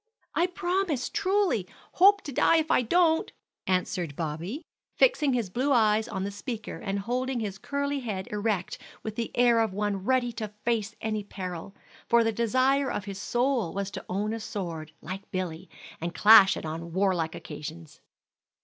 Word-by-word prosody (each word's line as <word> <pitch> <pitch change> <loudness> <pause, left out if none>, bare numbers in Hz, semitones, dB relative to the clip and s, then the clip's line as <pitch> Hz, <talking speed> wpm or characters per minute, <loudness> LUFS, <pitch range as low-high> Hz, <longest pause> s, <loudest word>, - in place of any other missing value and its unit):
"I 345 - +2
promise 360 -6 -1
truly; 385 - +1 0.2
hope 400 +3 +5
to 290 - -6
die 280 - +4
if 315 0 0
I - - +5
don't!" 320 +6 +2 0.4
answered 180 -4 -1
Bobby, 170 - -4 0.3
fixing 325 - +3
his 230 -7 -1
blue 260 +7 0
eyes 220 -3 +3
on 190 -4 -3
the 200 - -3
speaker, 215 +1 -6
and 195 0 -3
holding 250 +5 -2
his 200 -3 -4
curly 280 +4 -2
head 205 -7 -4
erect 210 -3 -1 0.2
with 220 -1 -5
the 230 0 -2
air 240 -1 +5
of 220 -4 +1
one 205 -1 -1
ready 255 +1 +2
to 215 -2 -6
face 220 -3 0
any 215 -1 -2
peril; 185 -1 -7 0.3
for 235 0 +5
the 225 - +1
desire 255 +5 +2
of 205 - -3
his 195 -1 -6
soul 245 -6 0
was 200 0 -2
to - - -6
own 205 +4 -1
a 225 - -3
sword, 170 -7 -5
like 195 +2 -7
Billy, 180 -4 -4 0.3
and 170 +1 -4
clash 210 -2 +8
it - - -6
on 165 +2 -5
warlike 180 -4 +1
occasions. 155 +1 -9
215 Hz, 170 wpm, -28 LUFS, 190-255 Hz, 0.4 s, clash